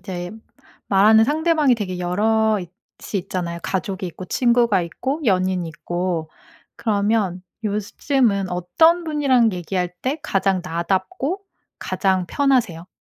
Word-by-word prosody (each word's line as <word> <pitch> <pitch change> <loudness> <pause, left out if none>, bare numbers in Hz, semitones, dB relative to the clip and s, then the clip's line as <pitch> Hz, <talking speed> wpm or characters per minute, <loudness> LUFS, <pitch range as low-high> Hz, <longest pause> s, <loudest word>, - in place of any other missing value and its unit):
이제 180 -1 -6 0.6
말하는 215 +3 +6
상대방이 310 -2 +2
대개 185 -5 -4
여럿이 210 +2 +1 0.5
있잖아요. 180 -3 -3
가족이 190 0 -3
있고 180 +2 -8
친구가 235 -4 +2
있고 265 - -3
연인이 185 -4 +1
있고. 170 0 -3 0.5
그러면 205 -4 0 0.2
요즘은 210 0 0
어떤 180 - +3
분이랑 270 -8 +2
얘기할 180 0 -2
때 270 +5 -1
가장 195 -1 +1
나답고 195 - -2 0.4
가장 190 -2 0
편하세요? 230 -11 +1
195 Hz, 270 characters per minute, -21 LUFS, 180-240 Hz, 0.6 s, 말하는